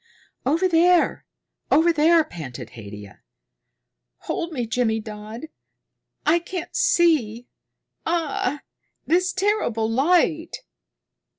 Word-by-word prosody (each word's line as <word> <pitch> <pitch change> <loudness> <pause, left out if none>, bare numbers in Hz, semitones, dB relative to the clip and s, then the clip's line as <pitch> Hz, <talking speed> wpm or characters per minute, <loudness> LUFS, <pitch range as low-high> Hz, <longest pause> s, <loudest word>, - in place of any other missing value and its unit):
"Over 330 +7 +2
there 350 0 +3 0.4
over 335 +2 +4
there," 325 +2 +4
panted 155 - -9
Haidia. 105 -2 -11 1.0
"Hold 340 0 -4
me, 250 -6 -3
Jimmydodd. 220 +2 -3 0.8
I 340 - +4
can't 345 0 -7
see. 310 - +2 0.6
Ah, 305 -4 -1 0.4
this 360 +2 +2
terrible 375 - 0
light!" 320 +6 +1
310 Hz, 85 wpm, -23 LUFS, 225-345 Hz, 1.0 s, over